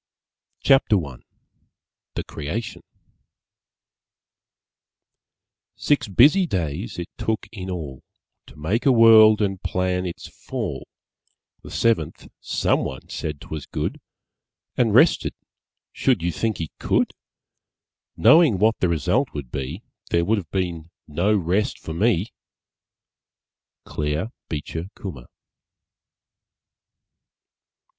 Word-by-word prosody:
CHAPTER 135 -5 +4
I 65 -4 -9 1.0
THE - - -2
CREATION 85 +10 -5 2.9
Six 140 -6 +1
busy 150 - +5
days 85 - -3
it 85 0 -4
took 110 0 -1
in 95 -4 -7
all 75 -8 -6 0.5
To - - -15
make 95 - -1
a - - +7
World 110 -2 +7
and 95 -2 -2
plan 90 0 -1
its 85 - -7
fall, - - -6 0.7
The - - -11
seventh, 110 -10 0
SOMEONE 65 - -1
said 75 -2 -5
'twas 75 -3 -7
good - - -4 0.7
And - - +2
rested, - - +4 0.6
should 125 -11 +1
you 85 - 0
think 110 +6 -2
he 80 -2 -5
could? - - +1 1.0
Knowing 155 - +6
what 110 +4 +2
the 90 - +1
result 85 - 0
would 70 -4 -6
be 70 - -5 0.3
There 85 0 +2
would 110 +2 +2
have 85 -6 -10
been 85 -3 -3 0.2
no 90 +8 +1
rest 100 +8 0
for 80 - -7
me! 105 +3 +1 1.5
_Claire 75 +9 -2 0.2
Beecher 80 +2 -4
Kummer. 75 - -8
95 Hz, 105 wpm, -23 LUFS, 80-110 Hz, 2.9 s, a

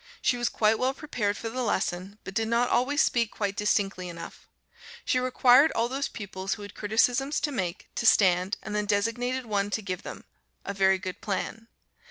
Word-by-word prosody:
She 250 - +2
was 240 0 0
quite 215 0 +2
well 260 +1 +1
prepared 215 -9 -2
for 230 - -5
the 255 +3 -3
lesson, 190 -3 -2
but 190 - -7
did 225 +3 0
not 235 +2 +2
always 280 +5 +2
speak 235 -2 +1
quite 205 -3 -3
distinctly 195 -4 0
enough; 170 -1 -10 0.6
she 255 - +2
required 255 +3 +5
all 230 +1 +1
those 270 +3 -2
pupils, 195 -2 -5
who 205 - -10
had 205 - -9
criticisms 245 +7 +1
to 295 - -1
make, 185 -8 -3
to 235 - 0
stand, 185 -2 +4
and 215 - -6
then 210 0 -1
designated 240 +5 0
one 205 -2 0
to 220 - -2
give 185 -2 -4
them - - -8 0.4
a 200 - -3
very 190 -1 +3
good 185 0 -7
plan. 220 +2 -4
215 Hz, 195 wpm, -27 LUFS, 195-245 Hz, 0.6 s, required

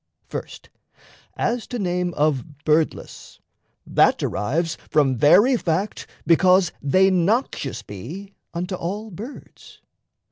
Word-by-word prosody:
First, - - -8 0.7
as 240 -1 -1
to 245 - -4
name 180 -3 -1
of 145 -1 -1
"birdless," 155 +1 -1 0.5
that - - +3
derives 165 - -1
From 140 -4 +3
very 195 - +5
fact, 185 +2 -2 0.2
because 180 +1 +4
they 185 +7 +3
noxious 185 - 0
be 165 - -9 0.2
Unto 180 +3 -4
all 205 +5 -4
birds. 220 - -11
175 Hz, 105 wpm, -22 LUFS, 150-195 Hz, 0.7 s, very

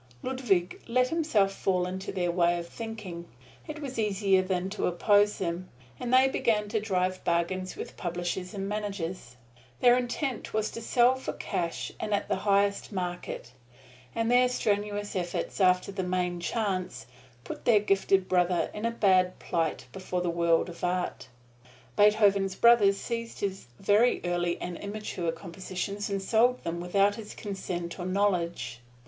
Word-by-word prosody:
Ludwig 225 -9 0
let 250 +1 +2
himself 300 -12 +2
fall 180 -2 0
into 185 +1 -4
their 175 -2 0
way 175 0 +2
of 170 0 -5
thinking 205 -6 -7 0.4
it 305 - -6
was 270 -5 -5
easier 195 -2 +2
than 185 -1 -1
to 210 - -1
oppose 205 +3 +3
them 175 0 -3 0.3
and 245 - -3
they 260 +1 +6
began 215 -5 +1
to 220 +1 0
drive 185 -3 -1
bargains 185 +2 -1
with - - -7
publishers 175 +2 -3
and 195 0 -3
managers. 195 - -4 0.4
Their 245 0 +6
intent 250 -1 -3
was 215 0 0
to 230 - -7
sell 240 +2 +4
for 260 0 -5
cash 170 -1 -3
and 215 - -2
in 200 - -1
the - - 0
highest 200 +1 +1
market; 180 - -4 0.6
and 230 +1 +1
their 250 0 +5
strenuous 205 -3 -1
effort 180 +2 -2
after 180 +1 +3
the 195 - -3
Main 180 -1 -1
Chance 190 -1 -2 0.4
put - - -8
their 225 -3 +6
gifted 195 -2 +2
brother 180 -1 +2
in 210 +2 -2
a - - +1
bad 185 -5 +3
plight 165 -2 -2
before 185 -1 -3
the 175 -1 0
world 170 -1 +2
of 175 -1 -10
art. 180 -6 -1 0.7
Beethoven's 200 -2 +4
brothers 210 -4 +5
seized 230 0 -5
his 195 -7 -3
very 210 +5 +3
early 175 0 0
and 175 -1 -5
immature 200 -4 -3
compositions 185 +4 -5
and 195 -1 -2
sold 240 +5 +3
them 170 +1 -3
without 195 +3 +2
his 210 0 -9
consent 180 -4 -5
or 175 - -3
knowledge. 180 -10 0
195 Hz, 155 wpm, -28 LUFS, 180-215 Hz, 0.7 s, they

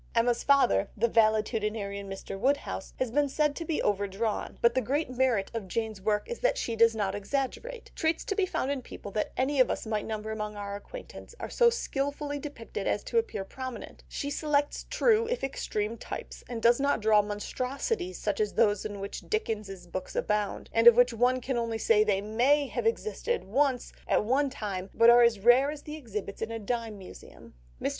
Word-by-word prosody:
Emma's 235 +1 +2
father, 275 - +4
the 230 +3 +3
valetudinarian 215 -2 +1
Mr. 195 0 -6
Woodhouse, 275 +8 -1
has 255 -3 -1
been 290 +2 +2
said 300 +1 +1
to 335 - -4
be 320 -1 -1
overdrawn, 205 +2 -1
but 235 0 +4
the 260 - +1
great 275 +4 -1
merit 250 -6 +1
of 225 -4 -4
Jane's 220 0 -3
work 210 +1 0
is 475 - -5
that - - +2
she 230 - -2
does 230 0 +5
not 200 -3 -1
exaggerate; 275 - -4
traits 320 0 0
to - - -1
be 390 -2 +1
found 275 -5 -1
in 280 -2 -2
people 205 - -9
that 210 +1 -2
any 270 +2 +1
of 255 - +5
us - - -2
might 215 -1 -2
number 220 0 -4
among 210 -1 -4
our 200 -1 -5
acquaintance 470 - -10
are - - -6
so 475 -1 +5
skilfully 285 -8 -2
depicted 280 -6 -6
as - - 0
to 465 - +1
appear 435 - -3
prominent; 255 +4 -8
she 285 - -4
selects 290 -1 0
true 460 -2 +3
if - - -2
extreme 225 -4 -2
types, - - -7
and 230 -2 -5
does 235 +2 +5
not 280 -3 +2
draw 215 -1 +5
monstrosities 260 - -3
such - - -2
as 430 - 0
those 205 -3 +3
in 205 -2 -5
which 200 0 -7
Dickens's 210 - -3
books 180 +2 -6
abound, 210 -1 -1
and 230 +1 +5
of 235 - +11
which 245 0 +5
one 250 +3 +2
can 255 0 -2
only 230 -1 -1
say 220 -1 +4
they 200 -2 +1
may 250 +8 +2
have 365 - -2
existed, 455 +1 -1
once, 255 +4 0
at - - +2
one 275 +5 +2
time, 200 -7 -5
but 230 +1 +7
are 240 0 +7
as 235 -4 +4
rare 245 +5 +6
as 295 -1 -6
the 300 - -7
exhibits 210 -8 -6
in 225 - -2
a 230 - -4
dime 225 0 -3
museum. 190 -2 -13 0.3
Mr. - - 0
235 Hz, 200 wpm, -29 LUFS, 210-285 Hz, 0.3 s, of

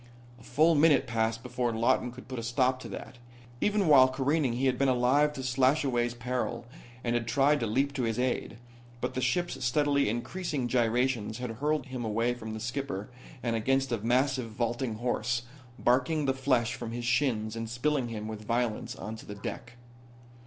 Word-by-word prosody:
A - - -16
full 155 +8 +3
minute 155 0 +5
passed 115 0 -1
before 125 -1 -1
Lawton 120 +2 +1
could 125 +1 -12
put 130 -2 -5
a - - -5
stop 130 +2 +1
to - - -8
that. 125 - -8 0.4
Even 210 -1 +2
while 135 -4 +8
careening 135 0 0
he 125 +3 -1
had 130 - +1
been 135 - +3
alive 130 +4 +3
to 135 -3 -6
Slashaway's 130 -2 +2
peril, 125 0 -3 0.4
and 120 - 0
had 120 -1 -1
tried 140 +5 +3
to 115 - -1
leap 135 +6 +1
to 135 - -2
his 115 -2 -1
aid. 125 -2 -1 0.4
But - - -2
the 130 - -2
ship's 175 +5 -1
steadily 140 0 +2
increasing 130 - -2
gyrations 120 -2 +1
had 125 -2 -4
hurled 150 +6 -1
him 130 -3 -5
away 115 +2 0
from 110 -2 -7
the - - -5
skipper 120 -3 -4 0.3
and 115 -2 0
against 135 +3 +1
a 115 - 0
massive 125 +2 +1
vaulting 120 +1 -2
horse, 120 +1 -1 0.3
barking 130 +6 +2
the 135 - +2
flesh 130 -3 +1
from 115 -4 -6
his 120 0 -4
shins 120 -4 +1
and 115 -1 -4
spilling 130 +2 0
him 110 -2 -5
with 110 -1 -6
violence 115 -2 -1
onto 110 +1 -8
the 105 - -6
deck. 115 +4 -7
125 Hz, 185 wpm, -29 LUFS, 115-135 Hz, 0.4 s, while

